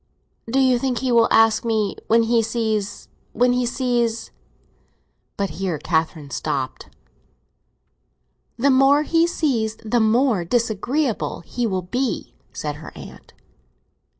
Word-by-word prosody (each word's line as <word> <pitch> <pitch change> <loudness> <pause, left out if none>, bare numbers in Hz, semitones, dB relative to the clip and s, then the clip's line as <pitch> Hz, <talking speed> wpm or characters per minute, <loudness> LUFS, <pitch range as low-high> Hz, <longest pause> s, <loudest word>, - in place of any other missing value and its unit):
"Do 255 - 0
you 255 -2 +3
think 255 -1 -1
he 255 +1 -1
will 235 -1 +5
ask 225 -1 +4
me 220 -4 0
when 230 +1 +4
he 230 0 +2
sees—when 220 +2 -2
he 250 -1 0
sees—?" 240 -3 -1 1.1
But 200 -1 -1
here 180 -5 -1
Catherine 160 -1 -2
stopped. - - -3 1.7
"The 275 +4 +3
more 270 +3 +5
he 330 +2 +2
sees 235 -10 -1
the 235 +2 +1
more 225 -2 +2
disagreeable 235 - -1
he 240 +7 -3
will 190 -3 -2
be," 245 +7 -3 0.2
said 150 -1 -5
her 160 - -10
aunt. - - -12
230 Hz, 125 wpm, -22 LUFS, 210-250 Hz, 1.7 s, will